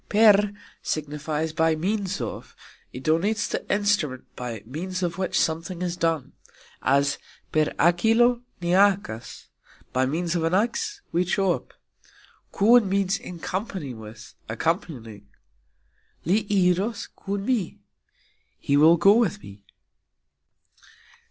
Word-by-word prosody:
"Per" 210 -1 +5 0.3
signifies 155 +1 -3
"by 160 -1 +2
means 195 +2 -2
of"; 115 - -6 0.4
it 125 - -8
denotes 200 +8 +1
the - - -3
"instrument" 205 -11 +1
by 115 -4 -6
means 180 +9 -4
of 175 +1 -2
which 190 - 0
something 165 +2 -1
is 175 -1 -2
done, 165 -5 -1 0.5
as 140 +1 +2 0.3
"Per 155 -1 +3
hakilo 225 +8 +4 0.2
ni 170 - -2
hakas", 190 - +1 0.4
By 130 0 +2
means 170 +4 -1
of 165 - 0
an 165 +2 +1
axe 410 - -1
we 175 +2 +2
chop. 190 0 -1 0.8
"Kun" 215 0 +5
means 195 0 +1
"in 180 - -9
company 185 - -4
with, 110 0 -11 0.2
accompanying". 115 - -3 1.0
"Li 205 +5 +2
iros 200 +2 +1
kun 200 0 -4
mi", 230 -8 -1 0.8
He 140 - 0
will 160 +4 +6
go 195 +5 +6
with 215 -2 +1
me. 100 0 -12
175 Hz, 120 wpm, -25 LUFS, 155-205 Hz, 1.0 s, will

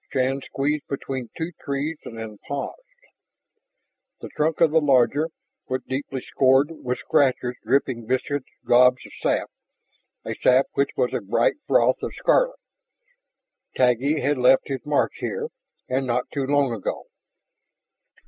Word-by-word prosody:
Shann 135 +1 0
squeezed 145 +3 -2
between 135 -3 -4
two 165 +1 -3
trees 145 +3 -2
and 115 - -8
then 110 -2 -7
paused. 140 - -4 1.4
The - - -8
trunk 155 +1 -1
of 165 -3 +5
the 160 0 +4
larger 145 +3 +3 0.4
was 130 0 -2
deeply 135 0 -3
scored 135 +3 +3
with 125 -6 -4
scratches 135 -5 +1
dripping 130 -4 0
viscid 130 +2 -1 0.2
gobs 125 +1 +5
of - - -13
sap, - - 0 0.7
a - - -3
sap 130 +2 +4
which 140 - +1
was 125 - +1
a - - -1
bright 115 - +1
froth - - +3
of - - -5
scarlet. - - +2 1.2
Taggi 130 +4 +2
had 145 -1 +1
left 130 +3 +4
his 135 -2 -3
mark 145 -1 +2
here, - - -3 0.4
and 130 +1 -1
not 125 +1 -1
too 140 -2 -1
long 140 -3 +2
ago. 110 - -4
135 Hz, 140 wpm, -24 LUFS, 125-145 Hz, 1.4 s, of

